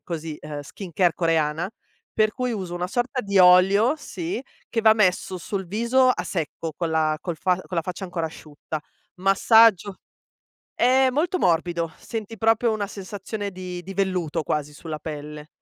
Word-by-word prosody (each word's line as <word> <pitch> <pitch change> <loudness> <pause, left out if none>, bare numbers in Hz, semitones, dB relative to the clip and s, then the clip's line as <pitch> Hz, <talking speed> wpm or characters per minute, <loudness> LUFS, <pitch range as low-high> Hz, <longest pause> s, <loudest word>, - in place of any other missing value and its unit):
così, 160 -3 -5 0.2
skincare 175 +2 -1
coreana, 165 +1 0 0.4
per 215 -1 +2
cui 250 -1 -2
uso 185 -5 -4
una 175 0 -2
sorta 250 +6 -2
di 200 -1 +1
olio, 190 +7 +6
sì, 335 -1 -5 0.3
che 230 - 0
va 220 -1 +7
messo 185 -3 +1
sul 190 +2 -4
viso 235 +7 +2
a - - -1
secco, 165 -1 -4
con 170 -2 -2
la 155 -1 +1
col 175 -3 -4
fa 185 +1 +2
con 180 - -5
la - - 0
faccia 185 +2 -5
ancora 175 -3 -3
asciutta 155 0 -7 0.4
massaggio 200 0 +5 0.8
è 260 +2 +5
molto 330 +7 0
morbido, 170 - +1
senti 225 -1 -6
proprio 225 +1 +3
una 215 -2 -1
sensazione 200 +1 -6
di 180 -1 -7
di 190 +2 -9
velluto 180 -5 -1
quasi 150 0 -2
sulla 155 0 -7
pelle, 150 0 -7
185 Hz, 160 wpm, -24 LUFS, 165-220 Hz, 0.8 s, va